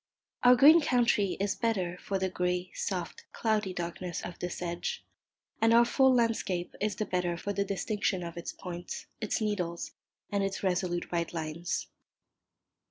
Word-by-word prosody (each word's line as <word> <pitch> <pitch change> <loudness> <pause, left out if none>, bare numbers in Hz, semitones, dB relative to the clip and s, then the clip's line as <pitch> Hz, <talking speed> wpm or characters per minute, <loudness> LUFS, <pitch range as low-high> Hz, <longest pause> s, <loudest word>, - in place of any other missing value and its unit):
Our 250 0 +8
green 300 +6 +8
country 235 -8 +2
is 200 0 +1
the 195 - -18
better 190 -7 0
for 195 - -1
the 190 0 0
grey, 180 0 -1
soft, 180 -3 -4
cloudy 215 -4 0
darkness 175 0 -4
of 175 - -8
the 180 - -2
sedge, 175 -1 -4 0.6
and 225 +1 +5
our 235 0 +7
full 265 +2 +4
landscape 225 -7 +1
is 210 -1 0
the 215 - -2
better 180 -2 -1
for 205 +4 -3
the 200 - +1
distinction 200 -1 -1
of 170 -1 -6
its 170 - -5
points, 175 -1 -7 0.2
its 215 - 0
needles, 180 -6 -2 0.4
and 200 -1 +1
its 195 0 -3
resolute 180 -2 0
right 170 -1 -1
lines. 165 +2 -3
190 Hz, 165 wpm, -30 LUFS, 175-215 Hz, 0.6 s, Our